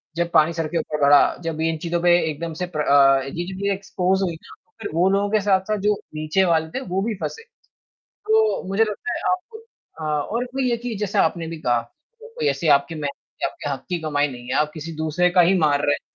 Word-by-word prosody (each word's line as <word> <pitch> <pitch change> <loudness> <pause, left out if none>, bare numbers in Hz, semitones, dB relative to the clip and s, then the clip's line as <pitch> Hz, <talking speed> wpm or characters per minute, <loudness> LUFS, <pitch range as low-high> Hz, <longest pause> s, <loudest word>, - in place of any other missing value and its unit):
जब 170 0 -1
पानी 160 +1 +4
सर 165 -1 -2
के 170 - -3
ऊपर 150 -2 -3
बढ़ा, 140 0 +5
जब 160 -1 -3
इन 160 0 0
चीज़ों 170 +1 -2
पे 175 0 +4 0.2
एकदम 160 +2 -5
से - - +1
प्र 150 - +1
अ, 135 -2 +5
ये 135 - -6 0.2
चीज़े 195 +1 -2
एक्सपोज़ 190 -1 -1
हुई 175 -3 -1
ना, - - -15
तो - - -40
फ़िर - - -4
वो 180 +3 +3
लोगों 200 +1 +1
के 215 - +3
साथ-साथ 200 +1 +1
जो 210 - +5 0.2
नीचे 155 +5 +1
वाले 160 -2 +1
थे, 265 - -4
वो 190 -3 -2
भी 220 +2 -2
फँसे। 450 - -5 0.6
तो 440 +1 +1
मुझे 200 +4 +3
लगता 215 +11 -4
है - - -4
आप 440 +5 -5 0.4
हाँ, 150 -1 -1
और 235 +10 -3
इसमें 260 +2 -4
ये 250 - +1
है 235 - +1
कि 240 -1 -5
जैसा 205 0 +1
आपने 165 0 -1
भी 165 0 -6
कहा, 120 -4 +1 0.4
कोई 465 0 -5
ऐसी 170 - -1
आपकी 140 +4 -10
मेहनत 150 -3 -3 0.3
की, - - +1
आपके 145 - -6
हक़ 135 -1 -5
की 180 - -1
कमाई 145 -2 +1
नहीं 125 -2 -10
है 130 - -1
आप 150 0 0
किसी 165 +1 -6
दूसरे 160 +3 +1
का 180 0 +4
ही 180 +3 +4
मार 150 -3 +2
रहे 145 - +3
हैं। - - -5
170 Hz, 245 wpm, -22 LUFS, 155-200 Hz, 0.6 s, बढ़ा